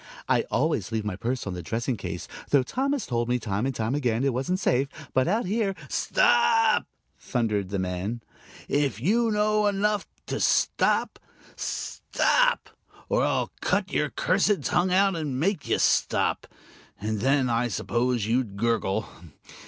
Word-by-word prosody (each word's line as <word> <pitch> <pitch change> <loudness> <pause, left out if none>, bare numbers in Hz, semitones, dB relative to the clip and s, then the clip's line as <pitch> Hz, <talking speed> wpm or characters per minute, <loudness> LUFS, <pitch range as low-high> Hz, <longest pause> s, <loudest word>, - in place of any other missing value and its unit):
"I - - +2
always - - 0
leave 110 -1 -2
my 105 -3 -2
purse 125 +6 -3
on 100 - -4
the 90 - -5
dressing 115 +8 -2
case, - - -6 0.2
though 140 -3 +4
Tom 270 - -1
has 275 -7 -2
told 120 0 -1
me, 125 - +2
time 110 +1 -2
and 120 -1 -1
again, 125 -4 0
it 135 -2 +1
wasn't 135 +10 -1
safe. 135 -5 +1 0.3
But 130 0 +2
out 215 +6 +1
here 200 0 0
" - - -18
"Stop!" 470 -1 +3 0.3
thundered 105 -6 -1
the 100 - -2
man. 95 +5 -3 0.4
"If 140 -7 0
you 225 - +2
know 210 0 +2
enough 205 0 0 0.2
to - - -3
stop. - - +2 0.4
Stop! - - 0 0.4
or - - +2
I'll - - 0
cut - - 0
your - - 0
cursed 210 -2 +1
tongue 180 +1 +1
out 195 0 +3
and 145 -6 -3
make 180 0 0
you - - +2
stop. - - +1 0.5
And 105 +1 -2
then, 135 +3 +2
I 120 +1 +1
suppose, 120 +2 -1
you'd 115 -3 -1
gurgle. 110 -2 0
130 Hz, 160 wpm, -26 LUFS, -, 0.5 s, though